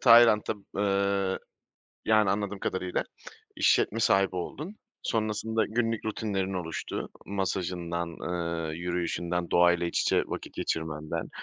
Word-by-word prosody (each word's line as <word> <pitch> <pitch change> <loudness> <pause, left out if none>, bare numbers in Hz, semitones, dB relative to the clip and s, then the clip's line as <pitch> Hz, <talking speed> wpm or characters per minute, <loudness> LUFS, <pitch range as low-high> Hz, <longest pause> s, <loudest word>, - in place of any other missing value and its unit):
Tayland'a 115 -3 +7 0.2
Eee, 100 -1 +1 0.7
yani, 110 -3 +4
anladığım 100 0 -1
kadarıyla 95 -1 -1 0.5
işletme 115 - +3
sahibi 95 -3 +3
oldun. 155 - -5 0.3
Sonrasında 110 0 0
günlük 115 0 0
rutinlerin 100 -3 -1
oluştu, 85 -3 -4 0.2
masajından, 90 -3 -2 0.2
ııı, 85 -2 -2
yürüyüşünden, 85 0 -2
doğayla 85 0 +4
iç - - 0
içe - - +3
vakit - - -6
geçirmenden. 80 -1 -2
95 Hz, 105 wpm, -29 LUFS, 85-105 Hz, 0.7 s, Tayland'a